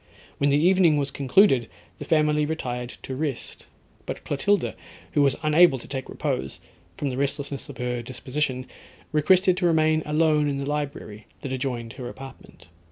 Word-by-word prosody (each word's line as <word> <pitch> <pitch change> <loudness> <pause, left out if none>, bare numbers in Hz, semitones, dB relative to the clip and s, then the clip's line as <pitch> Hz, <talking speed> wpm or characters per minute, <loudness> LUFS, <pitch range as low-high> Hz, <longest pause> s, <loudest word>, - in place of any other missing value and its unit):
When 140 - +3
the 140 - +4
evening 175 -1 +4
was 140 -1 -1
concluded, 135 - +3 0.3
the - - -6
family 150 -1 +2
retired 125 -6 -4
to 130 - -5
rest; 140 -3 -4 0.4
but - - -5
Clotilda, 200 +8 0 0.4
who 150 - +2
was 140 -1 +4
unable 155 -1 +5
to 120 - -11
take 135 -2 -5
repose, 65 +1 -3 0.4
from 140 - -2
the 125 - -5
restlessness 140 0 -2
of 140 - -9
her 125 -1 -2
disposition, 130 +2 -3 0.5
requested 180 +4 +4
to 180 -2 +2
remain 155 -1 +3
alone 150 -1 +2
in 140 - -2
the 140 - -3
library 140 -7 -4
that 130 - -4
adjoined 125 -3 -3
her 125 -2 -7
apartment. 135 -10 -12
140 Hz, 165 wpm, -25 LUFS, 130-155 Hz, 0.5 s, unable